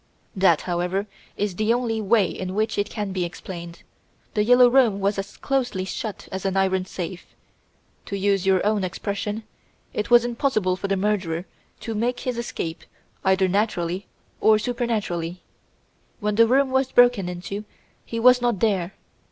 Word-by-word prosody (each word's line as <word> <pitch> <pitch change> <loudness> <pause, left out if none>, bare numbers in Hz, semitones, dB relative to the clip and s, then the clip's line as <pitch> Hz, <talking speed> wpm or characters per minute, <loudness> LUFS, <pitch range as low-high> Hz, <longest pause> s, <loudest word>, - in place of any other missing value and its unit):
"That, 185 -5 +4
however, 180 +3 -1 0.3
is 200 -3 -2
the 215 +1 +2
only 235 -2 0
way 215 0 +3
in 185 0 -5
which 215 0 0
it 205 - 0
can 205 -3 -4
be 185 -1 -1
explained. 170 -1 -7 0.5
"The 210 - +2
Yellow 245 +2 +7
Room" 240 -5 +4
was 200 0 0
as 195 - -6
closely 250 -9 -1
shut 210 +2 -5
as 190 0 -4
an 195 0 0
iron 190 -1 +1
safe. 180 -1 -7 0.7
To 200 - -3
use 195 -1 +1
your 190 -1 +2
own 210 -2 +1
expression, 205 +4 -3 0.5
it 210 - -2
was 240 -1 +6
impossible 230 -6 0
for 195 - -4
the 195 0 0
murderer 185 -4 -1 0.4
to 225 - -4
make 240 +3 -1
his 250 -2 -2
escape 170 -8 -4 0.4
either 190 0 +3
naturally 185 -2 -1 0.3
or 220 0 +5
supernaturally. 210 -7 -2 0.8
When 210 -1 -1
the 230 +2 +5
room 265 +2 +3
was 265 0 +1
broken 245 -7 +4
into 180 +4 -5 0.4
he 230 - -4
was 250 +1 +6
not 240 -5 +1
there! 195 -4 0
200 Hz, 160 wpm, -24 LUFS, 185-230 Hz, 0.8 s, Yellow